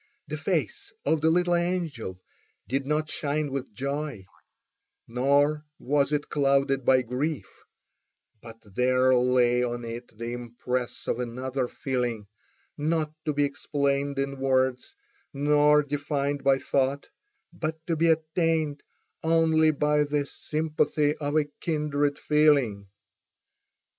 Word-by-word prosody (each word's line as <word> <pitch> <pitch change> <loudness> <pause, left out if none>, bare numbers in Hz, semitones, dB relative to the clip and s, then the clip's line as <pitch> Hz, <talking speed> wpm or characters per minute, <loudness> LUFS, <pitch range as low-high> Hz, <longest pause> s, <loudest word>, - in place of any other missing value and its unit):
The - - -4
face 400 -1 -2
of 160 -2 +2
the 160 - +4
little 175 +1 +2
angel 170 - -2 0.5
did 135 +2 -2
not 155 +1 0
shine 150 -1 -2
with 135 -2 -4
joy, 140 -4 -4 0.8
nor 140 +5 +2
was 140 +1 +1
it 150 -1 -1
clouded 140 -1 +2
by 130 0 +4
grief; 135 +6 -2 1.0
but 115 -1 -11
there 130 +2 +3
lay 125 -1 +3
on 120 -1 -2
it 115 -1 -8
the 115 +1 -4
impress 120 +1 -4
of - - -1
another 125 +2 -2
feeling, 120 -5 -2 0.5
not 155 0 -1
to 150 - 0
be 145 0 +2
explained 140 0 -1
in 140 0 -2
words, 130 -1 0 0.4
nor 150 +1 +4
defined 145 0 -2
by 135 -1 +4
thought, 135 +1 0 0.5
but 160 0 -4
to 165 - 0
be 165 +2 +2
attained 160 -2 +1 0.4
only 160 -1 +3
by 150 0 +2
the 145 0 -1
sympathy 150 0 0
of 145 0 -2
a 155 - +3
kindred 145 -3 0
feeling. 140 -10 +2
140 Hz, 125 wpm, -27 LUFS, 130-150 Hz, 1.0 s, the